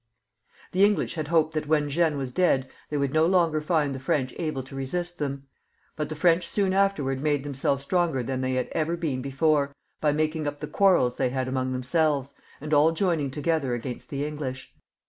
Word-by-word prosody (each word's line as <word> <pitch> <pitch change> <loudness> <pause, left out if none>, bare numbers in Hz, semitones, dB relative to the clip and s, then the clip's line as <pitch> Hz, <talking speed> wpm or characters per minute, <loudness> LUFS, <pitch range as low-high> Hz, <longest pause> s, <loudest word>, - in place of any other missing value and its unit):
The 190 +2 +3
English 205 0 +2
had 155 -3 -4
hoped 160 -1 +2
that 155 -1 -2
when 150 -1 +2
Jeanne 155 +1 +1
was 135 -2 -3
dead, 135 -4 +2 0.2
they 150 - -1
would 140 -1 0
no 155 +1 +4
longer 170 -4 +2
find 150 -3 +1
the 135 - -5
French 130 0 -1
able 155 -5 -2
to 135 +1 -11
resist 175 +6 -3
them; 140 -2 -3 0.5
but 150 - -3
the 155 - -4
French, 170 +2 +3
soon 195 -2 +1
after, 195 -5 +2
made 135 +2 0
themselves 140 -1 -1
stronger 165 -4 +1
than 130 +2 -3
they 130 0 -1
had 130 -1 -1
ever 165 +2 -1
been 145 -7 -2
before, 140 +1 +1 0.2
by 150 - +2
making 155 +1 -1
up 145 0 -3
the - - -4
quarrels 185 -11 +3
they 130 -2 +1
had 130 0 -2
among 130 0 -1
themselves, 140 +2 0 0.3
and 150 +2 -4
all 150 +2 +5
joining 165 -4 0
together 145 -2 0
against 120 +1 -6
the 140 0 -2
English. 140 -3 -5
150 Hz, 200 wpm, -26 LUFS, 135-165 Hz, 0.5 s, all